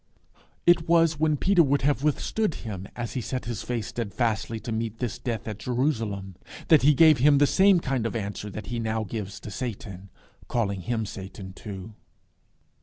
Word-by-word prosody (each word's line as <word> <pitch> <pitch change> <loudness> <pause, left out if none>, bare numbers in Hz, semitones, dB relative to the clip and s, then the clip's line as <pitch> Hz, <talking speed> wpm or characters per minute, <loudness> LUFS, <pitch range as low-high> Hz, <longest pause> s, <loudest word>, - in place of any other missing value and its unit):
It 175 -1 +4
was 165 -3 +4
when 155 -1 +2
Peter 190 +3 +4
would 140 -3 +2
have 140 -1 +2
withstood 155 +6 0
him 100 -3 -5
as 120 -2 -4
he 130 - -2
set 125 +1 -4
his 120 -3 -4
face 120 -4 -3
steadfastly 115 0 -2
to 115 - -5
meet 110 0 -2
this 120 0 -3
death 120 -3 -4
at 105 -1 -5
Jerusalem, 110 - -2 0.3
that 160 -4 +7
he 145 +2 +5
gave 155 -2 +6
him 145 +2 +6
the 145 - +5
same 190 +4 +5
kind 130 -7 -1
of 115 - -5
answer 105 -1 -4
that 105 +1 -7
he 120 +4 -4
now 110 -1 -1
gave 100 -1 -5
to 105 - -8
Satan, 100 -4 -6 0.4
calling 100 -5 -1
him 110 +4 -2
Satan 95 -1 -8
too. 100 +1 -8
115 Hz, 180 wpm, -26 LUFS, 105-145 Hz, 0.4 s, that